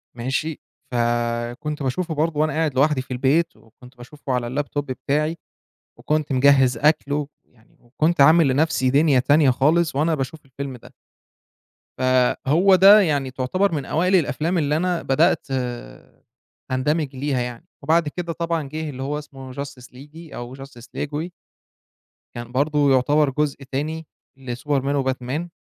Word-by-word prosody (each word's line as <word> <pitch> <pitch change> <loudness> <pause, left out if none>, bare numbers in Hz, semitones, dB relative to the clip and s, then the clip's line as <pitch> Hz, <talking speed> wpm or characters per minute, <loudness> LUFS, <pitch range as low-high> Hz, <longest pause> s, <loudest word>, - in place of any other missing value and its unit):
ماشي؟ 130 +6 -3 0.3
فكنت 120 +4 -2
باشوفه 160 +6 -2
برضه 155 0 0
وأنا 155 -1 +1
قاعد 155 -2 -1
لوحدي 140 0 +2
في 130 - -14
البيت 140 +7 +1
وكنت 125 +3 -19
باشوفه 130 +2 -7
على 120 -1 -1
الlaptop 145 +2 -2
بتاعي 150 +4 -2 0.6
وكنت 150 -2 -1
مجهّز 130 -2 +4
أكل 145 +1 +2
ويعني 140 -5 -7
وكنت 150 +6 -1
عامل 155 +1 +6
لنَفْسي 135 -1 +1
دِنيا 140 -1 +4
تانية 145 +2 +4
خالص 155 +6 +2
وأنا 160 +3 +2
باشوف 145 +2 -4
الفيلم 135 0 -7
ده. 120 - -16 1.1
فهو 130 +8 +3
ده 200 +3 +8
يعني 145 -7 0
تعتبر 140 +10 0
من 145 -4 -3
أوائل 180 +5 +1
الأفلام 170 +1 0
اللي 150 -1 +1
أنا 180 0 -1
بدأت 135 +1 +2 1.2
أندمج 145 +2 -1
ليها 135 0 -1
يعني 120 -1 -6
وبعد 160 +2 +2
كده 170 +2 -4
طبعًا 165 -1 -2
جِه 155 +1 -4
اللي 130 -2 -6
هو 145 +2 -2
اسمه 135 -3 -11
Justice 140 -2 -7
League 150 +5 -13
أو 120 +2 -7
Justice 135 -3 -12
League 145 - -2
Way. 160 +4 -3 1.1
كان 120 0 -7
برضه 145 +2 +2
يعتبر 145 +3 +3
جزء 145 0 -2
تاني 155 +3 -3 0.3
لSuperman 135 +2 -2
وBatman. 130 +6 -3
145 Hz, 145 wpm, -22 LUFS, 130-155 Hz, 1.2 s, ده